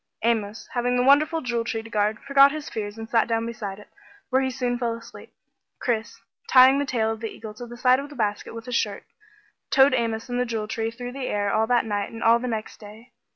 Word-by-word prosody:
Amos, 220 -2 -1
having 245 0 0
the 250 - +2
wonderful 305 +5 +4
Jewel 240 -3 -1
Tree 225 -1 -3
to 225 - -11
guard, 210 0 +1
forgot 275 0 +6
his 310 0 -6
fears 205 -1 -5
and 225 0 -7
sat 230 -1 +2
down 230 0 0
beside 210 -4 -5
it, 210 - -14 0.4
where 260 +1 +3
he 265 - 0
soon 250 -1 -2
fell 235 -2 -1
asleep. 230 - -13 0.5
Chris, 225 -3 -2 0.3
tying 260 +1 +7
the 285 - -1
tail 225 -4 0
of 225 - -5
the 225 - -4
eagle 215 0 -9
to 240 +3 -9
the 240 +1 -10
side 255 +1 +4
of 285 +1 -7
the 290 - -12
basket 210 -2 -2
with 230 0 -8
his 250 - -6
shirt, 205 -3 -1 0.7
towed 270 0 +5
Amos 230 -1 -1
and 245 0 -2
the 250 - +1
Jewel 220 -2 -3
Tree 225 +1 -2
through 245 +2 -7
the 265 0 -5
air 205 -1 -1
all 220 +1 +2
that 245 -1 +2
night 205 -2 -2
and 225 - -7
all 230 +1 +5
the 250 - -4
next 220 -2 -4
day. 215 +3 -13
230 Hz, 245 wpm, -24 LUFS, 220-255 Hz, 0.7 s, tying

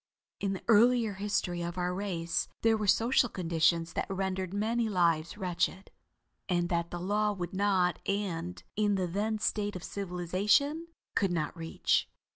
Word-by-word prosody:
In 195 -1 -1
the 190 - -6
earlier 230 0 +5
history 190 -3 -1
of 170 +1 -4
our 180 0 0
race, 180 -4 -2 0.2
there 225 0 +5
were 215 -1 -2
social 240 +4 +4
conditions 165 -2 +1
that - - -2
rendered 190 -1 -2
many 220 +3 0
lives 170 -2 +1
wretched, 185 0 -2 0.6
and 175 -1 +1
that 170 -1 0
the 175 - -5
law 210 +3 +1
would 180 -2 -5
not 190 -3 +2
and, 180 -4 -2
in 205 -1 +2
the 185 -1 0
then 205 +5 -1
state 205 -1 -1
of 180 - -6
civilization, 200 - 0 0.3
could 195 -3 +1
not 160 -2 -2
reach. 165 -1 0
190 Hz, 155 wpm, -30 LUFS, 175-210 Hz, 0.6 s, earlier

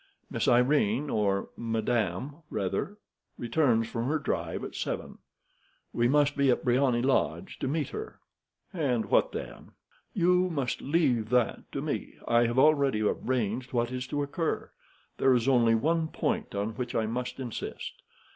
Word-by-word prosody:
Miss - - -1
Irene, 125 +1 +3
or 100 -2 0
Madame, 115 - -1
rather, 100 - -2 0.4
returns 120 -2 +2
from 115 +1 -3
her 155 +3 +1
drive 150 - -3
at - - -6
seven. - - -4 0.7
We 120 0 +2
must 145 +2 +3
be 140 -1 +3
at 125 - +2
Briony 125 -1 +2
Lodge 135 +7 0
to - - -2
meet 150 +3 -1
her." 430 +1 -7 0.5
"And 130 -10 0
what - - +4
then?" - - -8 0.4
"You 180 0 +3
must 140 -7 -2
leave 135 -8 +1
that 125 -1 0
to - - -3
me. - - -3
I 120 0 +4
have 120 +2 -2
already 140 -5 +4
arranged 120 +2 -1
what 120 0 0
is 125 0 -4
to 145 +2 -1
occur. 160 +3 -2 0.5
There 130 -1 +5
is 120 0 0
only 120 -4 +4
one 160 +7 +1
point 220 - -2
on 100 +2 -1
which 120 +2 -5
I 110 - +1
must 120 +4 -4
insist. 125 -4 -5
125 Hz, 155 wpm, -29 LUFS, 115-145 Hz, 0.7 s, There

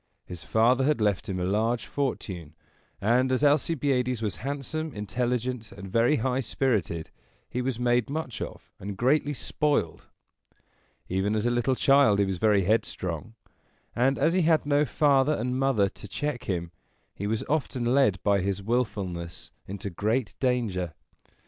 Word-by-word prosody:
His 90 -3 -9
father 115 - +3
had 150 -1 +2
left 105 -3 0
him 95 -1 -2
a - - -1
large 110 +5 0
fortune; 95 - -4 0.4
and, 125 +5 +2
as 130 +2 +1
Alcibiades 140 -4 +2
was 105 -6 -3
handsome, 145 - -4
intelligent, 120 +3 -2
and 95 -1 -9
very 120 +7 +3
high 130 0 0
spirited, 105 - -1 0.4
he 125 - -1
was 125 -2 -2
made 120 -1 +2
much 145 -5 -4
of - - -7
and 100 0 -6
greatly 145 +5 +2
spoiled. 145 - -1 1.0
Even 95 +3 0
as 110 +1 0
a 120 - +2
little 120 +2 +1
child 135 -6 +5
he 100 - +3
was 95 -2 -3
very 105 -2 +3
headstrong, 100 -1 -1 0.6
and, 135 +3 +2
as 160 +4 +2
he 185 - +3
had 160 -2 +3
no 145 +1 +3
father 140 +1 +3
and 125 -1 -2
mother 135 -7 +3
to 105 - -12
check 145 +5 -3
him, 85 -3 -2 0.4
he 100 - -4
was 110 +1 -1
often 135 -5 -1
led 125 -5 +3
by 100 -1 +3
his 100 +1 -2
willfulness 100 -7 -3 0.2
into 100 +1 -5
great 110 +6 -1
danger. 110 - -1
120 Hz, 155 wpm, -27 LUFS, 100-135 Hz, 1.0 s, child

